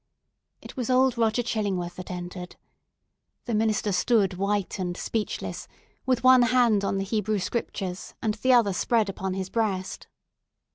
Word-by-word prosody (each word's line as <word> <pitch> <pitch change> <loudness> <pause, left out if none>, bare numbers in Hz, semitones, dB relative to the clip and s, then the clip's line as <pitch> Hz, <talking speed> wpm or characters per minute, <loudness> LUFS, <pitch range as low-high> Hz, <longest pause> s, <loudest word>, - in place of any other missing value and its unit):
It - - -11
was 255 -2 -3
old 255 0 +3
Roger 230 0 +1
Chillingworth 195 -6 -2
that 185 - -8
entered. 180 0 -7 0.9
The 240 - -3
minister 215 -1 +1
stood 200 0 +2
white 200 +1 -1
and 180 -1 -3
speechless, 220 -2 -4 0.4
with 255 -2 +1
one 255 0 +7
hand 240 -4 +3
on 195 - 0
the 195 - -1
Hebrew 210 +1 -1
Scriptures, 190 -2 -4
and 220 -2 0
the 255 +5 +1
other 225 -5 +4
spread 220 +2 +1
upon 190 -1 -3
his 190 0 -4
breast. 200 -5 -2
210 Hz, 150 wpm, -26 LUFS, 190-235 Hz, 0.9 s, one